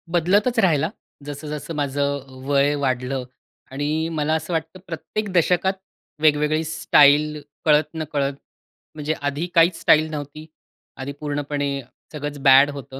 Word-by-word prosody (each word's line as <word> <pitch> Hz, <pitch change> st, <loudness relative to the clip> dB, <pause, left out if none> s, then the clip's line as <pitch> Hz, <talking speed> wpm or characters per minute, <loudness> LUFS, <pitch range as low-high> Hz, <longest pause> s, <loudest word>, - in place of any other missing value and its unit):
बदलतच 205 Hz, +8 st, +2 dB
राहिला, 160 Hz, -5 st, +2 dB, 0.4 s
जसं-जसं 150 Hz, +1 st, -6 dB
माझं 140 Hz, 0 st, -1 dB
अ, 135 Hz, 0 st, -16 dB, 0.2 s
वय 140 Hz, +1 st, +3 dB
वाढलं 130 Hz, 0 st, -1 dB, 0.5 s
आणि 150 Hz, +3 st, -1 dB
मला 150 Hz, +1 st, +1 dB
असं 160 Hz, +2 st, -2 dB
वाटतं, 165 Hz, +3 st, -3 dB
प्रत्येक 185 Hz, +5 st, -4 dB
दशकात 180 Hz, +2 st, +2 dB, 0.5 s
वेगवेगळी 155 Hz, +1 st, +3 dB
स्टाईल 150 Hz, -1 st, +4 dB, 0.2 s
कळत-नकळत 150 Hz, -2 st, +1 dB, 0.6 s
म्हणजे 155 Hz, +1 st, -2 dB
आधी 145 Hz, +4 st, -2 dB
काहीच 165 Hz, +1 st, +4 dB
स्टाईल 155 Hz, -1 st, +4 dB
नव्हती. 150 Hz, +1 st, -7 dB, 0.5 s
आधी 135 Hz, +1 st, -5 dB
पूर्णपणे 145 Hz, -1 st, -2 dB, 0.4 s
सगळंच 145 Hz, -1 st, -5 dB
बॅड 135 Hz, +1 st, +7 dB
होतं. 135 Hz, -1 st, -9 dB
150 Hz, 120 wpm, -22 LUFS, 145-160 Hz, 0.6 s, बॅड